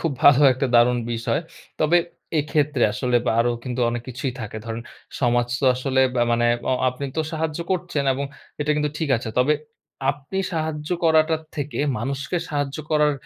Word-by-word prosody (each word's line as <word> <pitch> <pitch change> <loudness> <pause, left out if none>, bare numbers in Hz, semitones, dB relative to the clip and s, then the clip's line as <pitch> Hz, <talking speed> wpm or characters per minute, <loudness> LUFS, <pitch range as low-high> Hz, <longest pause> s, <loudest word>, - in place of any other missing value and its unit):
খুব 165 -4 0
ভালো 145 -1 +8
একটা 130 +2 -1
দারুণ 120 +1 +5
বিষয়। 115 +2 -1 0.4
তবে 155 +3 +4 0.4
এক্ষেত্রে 150 -3 0
আসলে 125 +2 +1
বা - - +3
আরো 120 +1 +2 0.4
অনেক 120 0 -3
কিছুই 130 +1 -3
থাকে। 110 -1 -6
ধরেন 115 0 -5 0.4
সমাজ 120 -1 +2
তো - - 0
আসলে 130 +1 0
বা 120 - +2
মানে 120 0 +2 0.2
অ - - +3 0.2
আপনি 130 +3 -5
তো - - +2
সাহায্য 160 -1 -2
করছেন 175 -6 -1
এবং 140 +2 -2 0.4
এটা 150 +1 0
কিন্তু 150 -1 0
ঠিক 160 - -1
আছে। 115 0 -5
তবে 135 +4 +4 0.6
আপনি 145 +6 -8 0.2
সাহায্য 155 -2 -3 0.2
করাটা 160 0 +4 0.2
থেকে 145 0 -3 0.2
মানুষকে 135 +7 -3
সাহায্য 145 -2 -2
করার 150 -1 +4
140 Hz, 165 wpm, -23 LUFS, 120-150 Hz, 0.6 s, ভালো